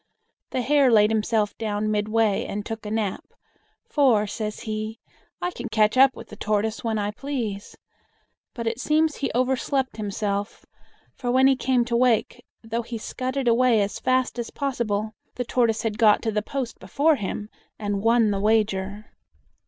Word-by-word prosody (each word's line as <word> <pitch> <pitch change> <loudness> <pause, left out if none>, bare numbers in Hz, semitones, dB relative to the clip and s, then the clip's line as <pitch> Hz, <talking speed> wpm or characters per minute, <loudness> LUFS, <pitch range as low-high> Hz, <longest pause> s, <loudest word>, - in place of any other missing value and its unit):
The 255 - -2
Hare 280 0 +4
laid 210 -1 +5
himself 215 -1 0
down 215 -1 -1
midway 215 0 +1
and 205 0 -4
took 220 -1 -6
a - - -3
nap; 215 -3 -2 0.6
"for," 250 -8 +3
says 210 0 -5
he, 215 0 -4 0.4
"I 355 - -2
can 240 -7 -7
catch 215 0 +3
up 265 0 +6
with - - -11
the - - -9
Tortoise 215 +1 -1
when 225 -2 -1
I 205 0 -1
please." 225 -5 -5 0.8
But 235 -2 -4
it 225 +1 -2
seems 310 +2 +1
he 275 - -1
overslept 260 0 0
himself, 205 0 -3 0.5
for 245 - -4
when 260 +2 +4
he 270 0 +5
came 255 -1 +1
to 235 0 -1
wake, 245 0 +2 0.2
though 225 +1 -2
he 230 0 -6
scudded 260 +3 -3
away 235 -1 +4
as 200 0 -1
fast 255 -1 0
as 235 - -3
possible, 220 -6 -2 0.2
the 245 - -3
Tortoise 230 -2 +1
had 220 -1 -2
got 215 -3 +5
to 225 - 0
the 210 0 0
post 255 +1 -5
before 300 +1 +2
him 210 0 -4 0.3
and 205 -2 -2
won 225 -1 +3
the 200 - -1
wager. 210 -1 0
225 Hz, 170 wpm, -24 LUFS, 210-255 Hz, 0.8 s, up